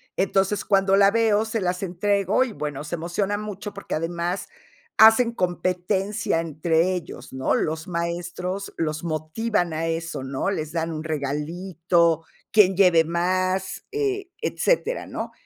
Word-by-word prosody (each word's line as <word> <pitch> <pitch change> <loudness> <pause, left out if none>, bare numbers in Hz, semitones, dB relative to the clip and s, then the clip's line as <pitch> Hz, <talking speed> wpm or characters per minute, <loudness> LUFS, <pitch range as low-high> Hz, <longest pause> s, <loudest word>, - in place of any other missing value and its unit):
Entonces, 195 +1 +1
cuando 195 -1 +3
la 200 0 +6
veo, 220 -2 +3
se 225 0 -2
las 180 0 -1
entrego 200 +4 +1
y, 230 - -7
bueno, 150 -3 -4
se 170 - -3
emociona 185 +5 -1
mucho 205 -1 -6
porque, 200 - -5
además, 170 +3 -2 0.5
hacen 225 +2 +7
competencia 185 +1 -1
entre 165 +3 +1
ellos, 175 - -8
¿no? 130 0 0
Los 160 +1 -2
maestros 175 +3 -3
los 155 0 -2
motivan 170 +4 -1
a 160 +1 -1
eso, 165 -3 -3
¿no? 135 +8 -2
Les 155 -5 -3
dan 165 0 -2
un 155 0 -5
regalito, 165 +3 0 0.3
quien 205 -4 +5
lleve 180 -4 +6
más, 185 +3 -1
eh, 405 -3 -1
etcétera, - - 0
¿no? - - -5
180 Hz, 140 wpm, -24 LUFS, 165-200 Hz, 0.5 s, hacen